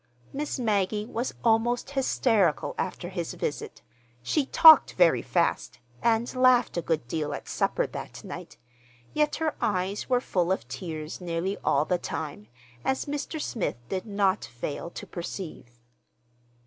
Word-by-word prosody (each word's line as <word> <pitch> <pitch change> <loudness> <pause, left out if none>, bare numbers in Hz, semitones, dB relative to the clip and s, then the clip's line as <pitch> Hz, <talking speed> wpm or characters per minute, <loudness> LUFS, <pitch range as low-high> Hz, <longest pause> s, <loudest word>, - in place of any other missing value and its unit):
Miss 290 +1 -3
Maggie 210 -3 0
was 235 +2 -3
almost 235 +3 +2
hysterical 225 - +2
after 180 -1 -4
his 175 -3 -4
visit. 145 - -4 0.4
She 280 - +1
talked 315 -3 +8
very 175 -3 +4
fast 170 -7 0 0.2
and 235 +2 +1
laughed 255 -1 +4
a 170 - 0
good 155 -6 -1
deal 150 +1 -2
at - - -9
supper - - 0
that - - -8
night; - - -8 0.6
yet 300 0 +2
her 320 -1 -1
eyes 195 +2 -1
were 250 -1 +4
full 180 -7 0
of 190 - -1
tears 160 -2 -6
nearly 175 +3 -2
all - - +2
the 180 -1 0
time, 145 -11 -5 0.4
as 265 - 0
Mr. 295 +2 -4
Smith 225 - -2
did 190 +3 -3
not 200 -1 +1
fail 140 +7 -5
to - - -8
perceive. 170 -9 -7
195 Hz, 145 wpm, -27 LUFS, 170-245 Hz, 0.6 s, talked